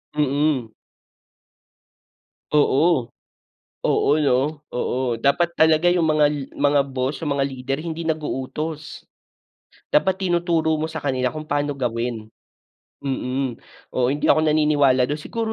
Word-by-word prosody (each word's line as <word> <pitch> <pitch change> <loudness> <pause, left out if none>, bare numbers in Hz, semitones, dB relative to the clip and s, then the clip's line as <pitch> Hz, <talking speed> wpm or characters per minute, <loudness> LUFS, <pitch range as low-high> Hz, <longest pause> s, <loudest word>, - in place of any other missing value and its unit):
Mm. 145 -4 +1 1.8
Oo. 150 -3 +2 0.7
Oo - - +2
'no, 145 +2 +1
oo. 125 0 -1
Dapat 170 +7 +1
talaga 160 +2 +4
yung 175 -3 +2
mga 155 -1 +4 0.3
mga 145 0 +3
boss, 130 +1 -3
yung 145 -2 0
mga 135 -1 +1
leader 135 +1 -4
hindi 165 0 -4
nag-uutos. 155 0 -4 0.9
Dapat 185 +5 +2
tinuturo 170 -2 +1
mo 160 - -1
sa 160 0 -6
kanila 130 -2 0
kung 155 0 -7
pa'no 145 0 0
gawin, 115 -3 -3 0.8
mm. 130 -2 -2 0.4
Oo, 125 -1 +2
hindi 145 - -1
ako 155 - +4
naniniwala 150 -4 +3
do'n. 145 - -1
Siguro 225 +5 -3
145 Hz, 120 wpm, -22 LUFS, 130-155 Hz, 1.8 s, talaga